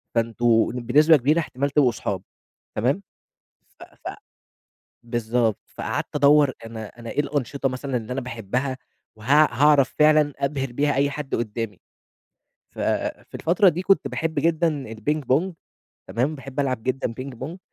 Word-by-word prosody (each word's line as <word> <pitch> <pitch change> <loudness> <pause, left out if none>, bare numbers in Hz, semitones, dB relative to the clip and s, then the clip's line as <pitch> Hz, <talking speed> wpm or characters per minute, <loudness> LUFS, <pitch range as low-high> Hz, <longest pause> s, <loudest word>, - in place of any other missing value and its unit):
فأنتم 115 0 +2
بنسبة 145 +6 +4
كبيرة 150 +6 +2
احتمال 140 -2 -2
تبقوا 135 -3 +3
صحاب، 95 -4 -4 0.5
تمام، 135 - +1 0.8
ف - - -10
ف - - -10 0.9
بالضبط. 115 -2 0
فقعدت - - -4
أدوَّر 145 -1 +5
أنا 110 -1 -7
أنا 115 -1 -7
إيه - - 0
الأنشطة 140 -1 -1
مثلًا 130 0 -3
اللي 115 +1 -4
أنا 135 - -2
باحبها 125 +3 -3 0.4
وها 145 +8 +4
هاعرف 145 -3 +5
فعلًا 150 -1 +5
أبهر 135 -2 -2
بيها 145 +3 +1
أي 140 +1 +2
حد 145 -1 -5
قدامي. 110 -3 -4 0.9
ف - - -18 0.5
في - - -26
الفترة 180 +4 +3
دي 175 +2 0
كنت 195 +1 +3
باحب 160 -1 -2
جدًا 155 -7 0
الPing 150 +8 -1
Pong، 180 +5 0 0.6
تمام، 135 +6 -1
باحب 135 0 -8
ألعب 130 -5 -1
جدًا 130 -2 -1
Ping 135 -1 -7
Pong، 160 +8 -6
135 Hz, 145 wpm, -24 LUFS, 120-150 Hz, 0.9 s, أدوَّر